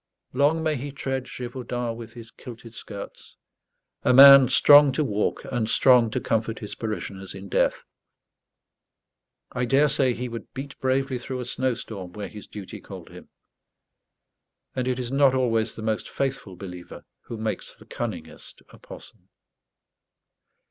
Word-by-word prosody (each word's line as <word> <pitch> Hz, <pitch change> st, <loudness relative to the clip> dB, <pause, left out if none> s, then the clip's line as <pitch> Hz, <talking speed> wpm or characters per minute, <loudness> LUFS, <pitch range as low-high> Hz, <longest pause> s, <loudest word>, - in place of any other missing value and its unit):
Long 145 Hz, +5 st, +2 dB
may 155 Hz, -2 st, 0 dB
he 140 Hz, +3 st, -6 dB
tread 135 Hz, -1 st, -4 dB
Gévaudan 120 Hz, -2 st, -5 dB
with 115 Hz, -1 st, -10 dB
his 115 Hz, -1 st, -11 dB
kilted 115 Hz, -2 st, -12 dB
skirts 100 Hz, -3 st, -10 dB, 0.6 s
a -, -, +3 dB
man 140 Hz, -1 st, +10 dB
strong 145 Hz, +2 st, +7 dB
to 155 Hz, -, 0 dB
walk 105 Hz, -6 st, -1 dB
and 120 Hz, -3 st, -1 dB
strong 125 Hz, -3 st, +5 dB
to -, -, -2 dB
comfort 110 Hz, 0 st, -1 dB
his 105 Hz, -, -7 dB
parishioners 100 Hz, -4 st, -6 dB
in 95 Hz, 0 st, -9 dB
death! -, -, +1 dB, 1.7 s
I 125 Hz, 0 st, -1 dB
daresay 135 Hz, 0 st, +3 dB
he 125 Hz, +1 st, -4 dB
would 115 Hz, -1 st, -9 dB
beat 135 Hz, +1 st, -7 dB
bravely 130 Hz, 0 st, 0 dB
through 130 Hz, +1 st, -6 dB
a 125 Hz, -, -4 dB
snowstorm 115 Hz, -8 st, -3 dB
where 105 Hz, 0 st, -6 dB
his 105 Hz, -, -11 dB
duty 100 Hz, -3 st, -9 dB
called -, -, -11 dB
him; -, -, -13 dB, 1.5 s
and 130 Hz, -1 st, -2 dB
it 130 Hz, -1 st, 0 dB
is 125 Hz, -1 st, -4 dB
not 135 Hz, -1 st, +4 dB
always 115 Hz, -3 st, 0 dB
the 110 Hz, -, -8 dB
most 110 Hz, -1 st, -2 dB
faithful 135 Hz, -8 st, -3 dB
believer 90 Hz, -1 st, -10 dB, 0.2 s
who 115 Hz, -, -7 dB
makes 110 Hz, 0 st, -4 dB
the -, -, -18 dB
cunningest -, -, -7 dB
apostle. -, -, -14 dB
125 Hz, 145 wpm, -25 LUFS, 110-135 Hz, 1.7 s, man